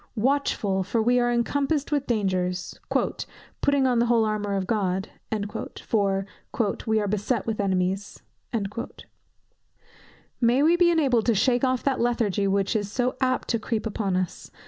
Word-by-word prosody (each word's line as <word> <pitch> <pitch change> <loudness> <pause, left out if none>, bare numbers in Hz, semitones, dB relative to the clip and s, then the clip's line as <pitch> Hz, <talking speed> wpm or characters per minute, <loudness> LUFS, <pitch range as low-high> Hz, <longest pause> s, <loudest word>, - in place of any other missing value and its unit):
Watchful, 225 -6 +1
for 200 +5 -1
we 245 +3 +3
are 240 0 +2
encompassed 280 +5 0
with 290 -2 0
dangers; 185 -5 -1 0.9
"putting 280 -1 +2
on 250 -2 +3
the 240 - +2
whole 230 -2 +3
armour 210 -2 -1
of 190 -1 -1
God," 195 -2 -1 0.7
for 195 -3 +1 0.6
"we 220 0 +3
are 205 - -1
beset 210 +2 -1
with 220 -2 -2
enemies." 190 0 -1 2.2
May 245 +4 +4
we 330 +3 +5
be 345 0 +4
enabled 270 -9 +2
to 230 - +4
shake 245 +5 +2
off 255 -1 +1
that 270 -2 +1
lethargy 220 -4 +1
which 195 +2 +1
is 205 -2 -1
so 250 +3 0
apt 255 -1 +1
to 230 - +1
creep 220 0 -2
upon 205 -3 -1
us! 185 -2 -4
225 Hz, 150 wpm, -25 LUFS, 200-250 Hz, 2.2 s, we